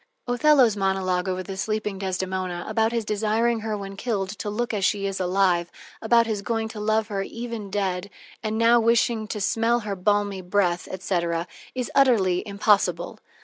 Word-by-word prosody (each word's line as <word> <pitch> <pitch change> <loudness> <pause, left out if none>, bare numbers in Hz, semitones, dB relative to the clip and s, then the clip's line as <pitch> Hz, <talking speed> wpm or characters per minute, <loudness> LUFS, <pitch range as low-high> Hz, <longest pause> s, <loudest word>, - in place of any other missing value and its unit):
Othello's 245 -2 +4
monolog 190 -2 0
over 185 0 -2
the 195 +1 -6
sleeping 210 0 -2
Desdemona, 185 -2 -3
about 225 0 +1
his 230 -2 -1
desiring 220 +3 +1
her 215 -1 -3
when 195 -1 -7
killed 200 -3 -2
to 205 +1 -5
look 235 +3 -2
as 200 -2 -1
she 200 +1 +1
is 195 -1 -2
alive, 180 -2 +1 0.3
about 230 +1 +4
his 215 -3 -2
going 225 +1 -1
to 220 - -8
love 215 +1 +1
her 200 -2 -2
even 230 -1 -6
dead, 195 -1 -2 0.3
and 220 0 -2
now 230 +1 +5
wishing 230 -1 +2
to 210 - -4
smell 230 +4 +1
her 205 -2 -4
"balmy 205 0 0
breath," 180 -1 0
etc., 170 -3 -2 0.3
is 250 -1 -3
utterly 210 -10 +4
impossible. 200 -4 +1
205 Hz, 170 wpm, -24 LUFS, 190-225 Hz, 0.3 s, now